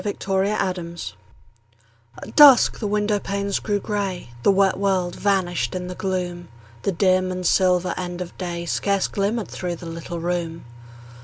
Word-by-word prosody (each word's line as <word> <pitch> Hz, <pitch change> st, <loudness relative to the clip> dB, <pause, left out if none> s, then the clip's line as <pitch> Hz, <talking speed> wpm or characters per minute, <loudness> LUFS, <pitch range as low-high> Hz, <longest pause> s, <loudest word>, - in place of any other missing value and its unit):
FORGIVENESS 190 Hz, -4 st, -2 dB, 1.1 s
At -, -, -11 dB
dusk 285 Hz, -5 st, +8 dB
the 215 Hz, -, -2 dB
window 210 Hz, 0 st, +1 dB
panes 200 Hz, 0 st, -2 dB
grew 205 Hz, -1 st, -1 dB
grey; 200 Hz, -, -3 dB
The -, -, +3 dB
wet 195 Hz, -1 st, +2 dB
world 190 Hz, -3 st, 0 dB
vanished 175 Hz, -10 st, 0 dB
in 180 Hz, 0 st, -3 dB
the 180 Hz, -, -5 dB
gloom; 180 Hz, -2 st, -3 dB, 0.3 s
The 200 Hz, -, 0 dB
dim 185 Hz, 0 st, +2 dB
and 180 Hz, 0 st, -4 dB
silver 180 Hz, -1 st, +3 dB
end 180 Hz, -1 st, -5 dB
of 180 Hz, -1 st, -6 dB
day 170 Hz, -2 st, -4 dB
Scarce 200 Hz, +3 st, 0 dB
glimmered 210 Hz, +2 st, -2 dB
through 175 Hz, -1 st, -4 dB
the 170 Hz, -, -11 dB
little 165 Hz, +1 st, -6 dB
room. 170 Hz, -2 st, -3 dB
185 Hz, 150 wpm, -22 LUFS, 175-200 Hz, 1.1 s, dusk